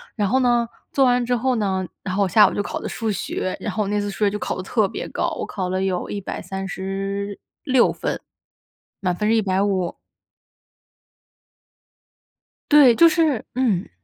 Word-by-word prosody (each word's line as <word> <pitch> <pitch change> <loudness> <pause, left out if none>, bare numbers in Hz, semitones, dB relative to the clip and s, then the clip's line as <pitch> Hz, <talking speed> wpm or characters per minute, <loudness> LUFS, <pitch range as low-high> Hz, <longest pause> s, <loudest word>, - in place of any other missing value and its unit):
然 205 -4 0
后 260 - +3
呢， 240 -2 +3 0.3
做 275 - +4
完 245 -1 +3
之 245 0 +1
后 255 +1 +1
呢 190 -3 -1 0.2
然 185 -2 -3
后 200 - +2
我 - - +1
下 210 +3 +7
午 - - -3
就 205 - -1
考 - - -4
的 - - -5
数 225 -2 -2
学， 185 -1 -3
然 210 - -4
后 215 - 0
我 200 - -4
那 205 0 0
次 205 0 -2
数 200 - -8
学 200 - +3
就 210 - -4
考 - - -3
得 185 - -5
特 210 0 +1
别 - - -6
高， - - -1
我 - - -3
考 185 -2 -4
了 185 +1 -1
有 185 -2 -2
136 195 0 -4
分， - - -30 1.6
满 180 -3 -1
分 210 +3 0
是 225 - +4
150。 190 -3 0 2.7
对， 285 -6 +7
就 335 +5 +7
是 310 -8 +1
嗯。 225 -9 0
205 Hz, 185 characters per minute, -22 LUFS, 190-235 Hz, 2.7 s, 下